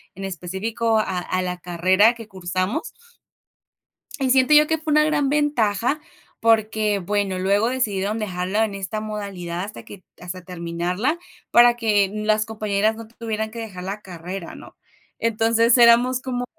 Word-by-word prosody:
en 195 +1 -6
específico 195 +5 -2
a 190 -4 -1
a 185 +1 -2
la 180 0 -3
carrera 185 +6 +3
que 225 -2 -10
cursamos 185 - -3 1.3
y 265 -1 0
siento 260 +3 +4
yo 300 0 +7
que 320 - +1
fue 315 0 -4
una 305 +1 +5
gran 295 -3 +1
ventaja, 280 -3 +1 0.4
porque, 220 -2 +2
bueno, 195 0 -1
luego 200 +5 +2
decidieron 215 -4 -1
dejarlo 185 0 -2
en 220 -3 0
esta 195 +2 -4
modalidad 195 -5 -5
hasta 210 +1 -8
que 195 -2 -13 0.2
hasta 180 +1 -7
terminarla, 180 - -2 0.3
para 240 0 +6
que 215 -4 +2
n 210 +2 -5
las 215 0 +2
compañeras 215 -1 0
no 225 0 -10
tuvieran 220 -1 -4
que 230 +1 -8
dejar 195 -5 -7
la 200 +2 -5
carrera, 180 0 -8
¿no? - - -13 0.4
Entonces, 230 +1 +3
éramos 240 +2 +5
como 250 -2 -3
215 Hz, 155 wpm, -22 LUFS, 190-230 Hz, 1.3 s, yo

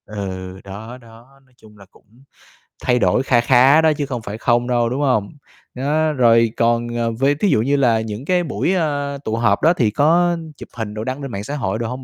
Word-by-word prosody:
Ừ, 95 -2 -7
đó, 110 +5 -9
đó, 120 +3 -18
nói 130 - -31
chung 105 -1 -19
là 100 - -15
cũng 120 +6 -24 0.6
thay 125 0 +2
đổi 95 +4 +2
kha 120 -3 +2
khá 130 +5 +5
đó 160 -1 +3
chứ 145 - -2
không 125 -4 -5
phải 105 -1 -7
không 120 +1 +1
đâu, 120 -2 +1
đúng 130 +4 -3
không? 125 -8 +1 0.5
Đó, 150 +4 0
rồi 115 -4 +3
còn, 120 0 +1
ờ, 115 -1 -1
v 115 +4 -6 0.2
thí 205 - +2
dụ 125 -9 +2
như 140 +5 +1
là 120 -5 +2
những 110 +3 -6
cái 180 +1 +1
buổi, 170 +3 -1
ơ, 145 -5 -1
tụ 110 - -2
họp 115 -3 +1
đó 165 - +4
thì 115 -10 0
có 170 +7 +2 0.2
chụp - - -11
hình 110 -2 -4
đồ 110 0 -5
đăng 130 +4 -4
lên 135 -2 -6
mạng 100 -1 -5
xã 140 +7 -5
hội 125 -5 -2
đồ 115 - -2
hông 125 +2 -6
120 Hz, 235 wpm, -19 LUFS, 110-140 Hz, 0.6 s, khá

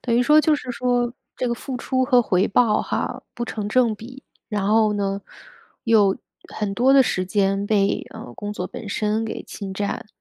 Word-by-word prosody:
等 235 - -1
于 245 - +4
说 300 +5 +6
就 310 +1 +3
是 255 -3 -5
说 245 -1 0 0.2
这 250 - -1
个 235 - 0
付 255 +2 -6
出 260 +1 0
和 250 -1 +4
回 190 -2 +2
报 215 0 +3
哈， - - -3
不 240 - -3
成 215 -3 -4
正 235 0 +3
比。 255 +5 -11 0.3
然 205 -3 -1
后 215 0 +4
呢， 200 -1 -1 0.6
又 210 -4 +4 0.4
很 210 -2 -2
多 255 +5 +4
的 275 -1 +7
时 185 -7 -1
间 195 +1 +1
被， 200 -2 +1
嗯， 120 - -9
工 205 0 -5
作 180 - -4
本 210 - -8
身 215 +2 0
给 220 - -5
侵 195 -2 -7
占。 205 +1 -3
220 Hz, 210 characters per minute, -22 LUFS, 200-245 Hz, 0.6 s, 的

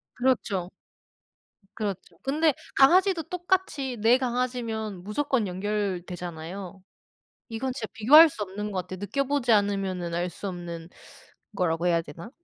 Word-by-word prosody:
그렇죠. 220 -8 0 1.1
그렇죠. 190 -5 -5
근데 300 +2 +2 0.2
강아지도 350 +4 +5
똑같이 350 -7 -1
내 235 +3 +5
강아지면 235 -6 -2
무조건 230 +1 0
연결되잖아요. 185 -2 -4 0.7
이건 240 +3 -3
진짜 230 -5 -5
비교할 300 +9 +8
수 220 - -9
없는 205 +2 -5
것 185 -2 -1
같아요. 185 - -6
느껴보지 260 +4 0
않으면은 195 -4 +1
알 175 +1 -1
수 200 - -7
없는 170 -2 -6 0.7
거라고 170 -2 0
해야 170 -1 +3
되나? 165 +6 -10
210 Hz, 300 characters per minute, -26 LUFS, 180-260 Hz, 1.1 s, 비교할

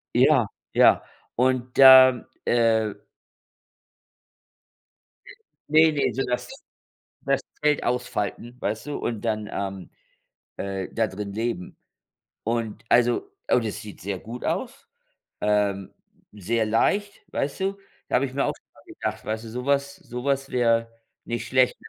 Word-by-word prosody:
Ja, - - +5 0.3
ja. - - +6 0.3
Und, 125 0 +1
ähm, 130 -2 +9 0.2
äh 115 -3 +2 2.8
Ne, 155 +1 +6
ne, 145 -2 0
so 135 - -1
das 125 0 -3 0.7
das - - 0 0.2
Zelt 150 -1 +2
ausfalten, 120 -1 -2
weißt 110 +5 -2
du? 145 - -3
Und 115 -3 -3
dann, 110 -2 -2
ähm, 95 -2 -5 0.7
äh, 95 -1 -4
da 115 -1 +1
drin 100 +1 -6
leben. 110 -4 -3 0.7
Und 115 -1 -2
also 120 - +2 0.2
und 120 - +3
es 105 - -4
sieht 105 -2 -11
sehr 100 0 -4
gut 115 +6 -9
aus, - - -3 0.6
ähm, 100 -2 0 0.4
sehr 110 +3 -1
leicht, 200 - 0
weißt 140 +5 -2
du? 195 +1 -1 0.3
Da - - +1
habe 135 - +3
ich 130 - -7
mir 140 - 0
auch - - 0
schon - - -18
gedacht, 110 0 -4
weißt 110 +1 -3
du - - -8
sowas 140 +4 -1
sowas 135 +3 -3
wäre 115 -2 +1 0.3
nicht 120 -1 -4
schlecht. 130 -1 +3
115 Hz, 130 wpm, -25 LUFS, 105-130 Hz, 2.8 s, ähm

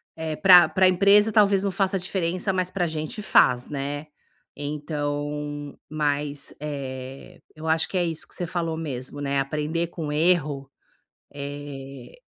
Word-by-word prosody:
É 160 -1 -3
para 180 0 +8
para 185 0 +4
empresa 200 +4 +5
talvez 200 -2 +4
não 200 - 0
faça 195 +1 0
diferença, 185 +1 -1
mas 185 -1 -1
para 180 -2 0
gente 155 +5 -5
faz, 125 -11 +3
né, 145 +1 -4 0.5
então, 145 0 -4
mas, 145 -1 -2
eh, 135 -3 -7 0.2
eu 155 +1 -7
acho 160 0 +2
que 190 - -3
é 180 - +2
isso 165 -2 -3
que - - -7
você 175 - -3
falou 165 -1 -2
mesmo, 145 -3 -5
né, 140 0 0
aprender 150 +4 -1
com 165 -3 -5
erro, 150 -4 +1 0.7
eh, 140 -2 -8
150 Hz, 145 wpm, -25 LUFS, 145-180 Hz, 0.7 s, para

